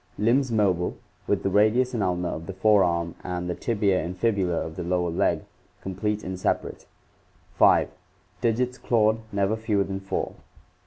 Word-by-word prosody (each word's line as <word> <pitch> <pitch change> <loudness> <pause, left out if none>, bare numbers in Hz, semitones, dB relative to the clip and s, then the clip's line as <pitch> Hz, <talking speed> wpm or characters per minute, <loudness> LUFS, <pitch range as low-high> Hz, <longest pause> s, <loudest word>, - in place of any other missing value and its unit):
Limbs 120 +4 +2
mobile, 95 -5 +1 0.3
with - - 0
the 95 - 0
radius 110 +6 +3
and 115 - -1
ulna 90 -2 0
of 80 +1 -6
the 95 - -5
fore 105 +1 +4
arm 85 -1 0
and 90 -1 -3
the 90 - -1
tibia 100 -3 0
and 90 +2 -5
fibula 95 -5 +1
of 80 0 -7
the - - -4
lower 90 0 0
leg 85 - +1 0.4
complete 105 +3 -2
and 95 0 -5
separate, - - -2 0.7
5. - - +5 0.5
Digits 125 +1 0
clawed, 110 -1 +2
never 100 +1 +1
fewer 110 -3 0
than 95 0 -4
four. 95 0 -3
100 Hz, 165 wpm, -25 LUFS, 90-110 Hz, 0.7 s, 5